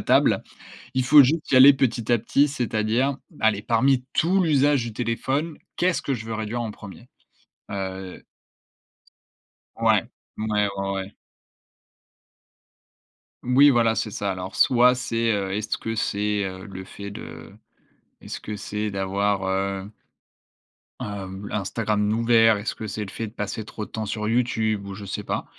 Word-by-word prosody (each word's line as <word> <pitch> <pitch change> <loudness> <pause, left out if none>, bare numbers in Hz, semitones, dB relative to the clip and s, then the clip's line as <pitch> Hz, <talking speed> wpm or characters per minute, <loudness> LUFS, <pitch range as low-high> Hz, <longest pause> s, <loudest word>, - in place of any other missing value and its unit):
imbattable. - - +3 0.5
Il 130 -1 +1
faut 145 +3 +8
juste 155 +4 0
y - - +6
aller 135 +2 +10
petit 120 -3 0
à 120 - +4
petit, 140 +6 +2
c'est-à-dire 120 0 0 0.2
m - - -18
aller, 110 -2 +2
parmi 125 +3 +2
tout 185 +4 +2
l'usage 145 -5 +3
du 115 - -5
téléphone, 130 +7 -2 0.2
qu'est-ce 180 0 +1
que 140 - -1
je 110 -2 -7
veux 110 - -4
réduire 110 +2 -3
en 110 - -4
1er? 105 +4 -12 2.7
Ouais, - - +3 0.3
ouais, 105 -1 0
ouais, 100 0 -2
ouais. 95 +1 -5 2.3
Moui 135 +4 +6
voilà, 115 -4 +3
c'est 105 - -2
ça 100 -1 -2
alors 95 +1 -6
soit 125 0 +5
c'est, 115 -2 0
heu, 100 -2 -1
est-ce 105 +2 -2
que 115 0 -4
c'est, 105 -1 0
heu, 95 0 -7
le 95 -2 -8
fait 100 +2 -9
de - - -10 0.7
est-ce - - -7
que 105 - -6
c'est 105 +1 -4
d'avoir 100 0 0
heu 95 +1 -2 1.1
heu, 100 -1 -6
l'Instagram 105 +1 -1
d'ouvert? 115 -1 +4
Est-ce 100 - -3
que 110 - -6
c'est 105 +1 -4
le 100 - -8
fait 115 +1 -4
de 105 - -12
passer 105 0 -4
trop 105 -1 -6
de - - -19
temps 110 -1 -3
sur 105 +1 -3
YouTube 110 -4 0
ou 100 - -6
je 105 - -9
sais 95 - -4
pas. - - -2
110 Hz, 155 wpm, -24 LUFS, 100-125 Hz, 2.7 s, aller